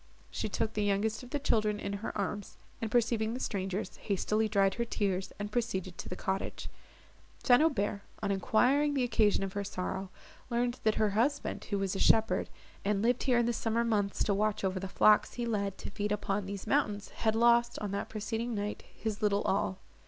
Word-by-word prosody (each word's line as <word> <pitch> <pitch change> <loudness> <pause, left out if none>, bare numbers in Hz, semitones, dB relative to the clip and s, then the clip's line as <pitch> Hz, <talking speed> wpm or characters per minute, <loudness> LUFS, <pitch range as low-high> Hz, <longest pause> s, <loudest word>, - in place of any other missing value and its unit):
She 215 - -3
took 220 +2 -1
the 210 - -1
youngest 205 +2 0
of 250 - -11
the 290 - -1
children 215 -6 +1
in 200 - -3
her - - -3
arms, 205 0 -3 0.2
and, 225 - -2
perceiving 230 -1 +1
the - - -4
strangers, 195 -2 -3
hastily 215 +2 0
dried 195 -2 +3
her 235 - -1
tears, 195 -5 -1
and 205 0 -5
proceeded 190 -7 -2
to - - -6
the 180 - -4
cottage. 190 +1 -3 0.7
St. 245 +1 +6
Aubert, 210 -10 +1 0.2
on 200 - +1
enquiring 255 +9 +3
the 265 - +2
occasion 220 -4 +2
of 195 -1 -4
her 205 - -2
sorrow, 190 0 -4 0.4
learned 240 +1 0
that 220 - +4
her 215 -2 +2
husband, 240 +8 0
who 205 - -1
was 195 -1 -1
a - - -2
shepherd, 220 -4 +3 0.3
and 200 0 +1
lived 245 +1 +2
here 250 -2 +3
in 240 - +3
the 240 - +1
summer 230 +1 0
months 205 -4 +1
to 205 - +1
watch 210 +1 0
over 190 -1 0
the 195 - -4
flocks 210 +3 +4
he 240 - -2
led 200 -4 -1
to - - -7
feed 205 0 -2
upon 200 -1 -1
these 200 -1 -5
mountains, 205 -1 0
had 220 -1 0
lost, 235 +1 +4
on 205 -2 -3
the 200 - -1
preceding 225 +2 -3
night, 205 0 -3
his 220 -2 -4
little 205 -1 +2
all. 190 -1 0
210 Hz, 205 wpm, -31 LUFS, 200-230 Hz, 0.7 s, St